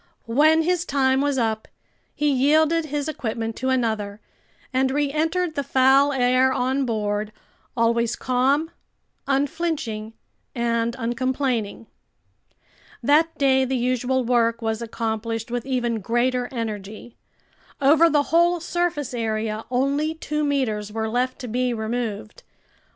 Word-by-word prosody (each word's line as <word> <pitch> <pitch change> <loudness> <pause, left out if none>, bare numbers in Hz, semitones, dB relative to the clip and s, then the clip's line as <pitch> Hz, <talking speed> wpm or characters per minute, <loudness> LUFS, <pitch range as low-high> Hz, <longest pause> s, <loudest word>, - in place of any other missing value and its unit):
When 305 +7 +4
his 355 0 +1
time 265 -3 +1
was 285 -1 0
up, 220 -3 -1 0.5
he 295 - 0
yielded 310 +5 +3
his 295 0 -3
equipment 225 -6 -3
to 260 - -1
another 220 -5 -1 0.5
and 260 +1 +2
reentered 310 +5 0
the 285 - -1
foul 270 +2 +4
air 255 0 +3
on 260 +1 0
board, 210 -1 -2 0.5
always 235 0 +2
calm, 270 +6 +1 0.6
unflinching, 275 -6 -2 0.4
and 235 -1 0
uncomplaining. 245 -2 -2 1.2
That 310 +5 +3
day 265 -1 +3
the 260 0 -1
usual 255 +1 0
work 230 -1 +2
was 220 -1 -2
accomplished 225 0 -3
with 245 +1 -3
even 240 -3 -1
greater 245 +4 0
energy. 220 -1 -6 0.6
Over 305 +4 +5
the 295 -2 +3
whole 345 +1 +4
surface 340 -5 -2
area, 220 -2 -2
only 280 +5 0
two 300 -1 -3
meters 230 -8 -1
were 220 0 -2
left 250 +3 -1
to 250 - -5
be 245 +1 -1
removed. 220 - -4
255 Hz, 125 wpm, -23 LUFS, 230-285 Hz, 1.2 s, Over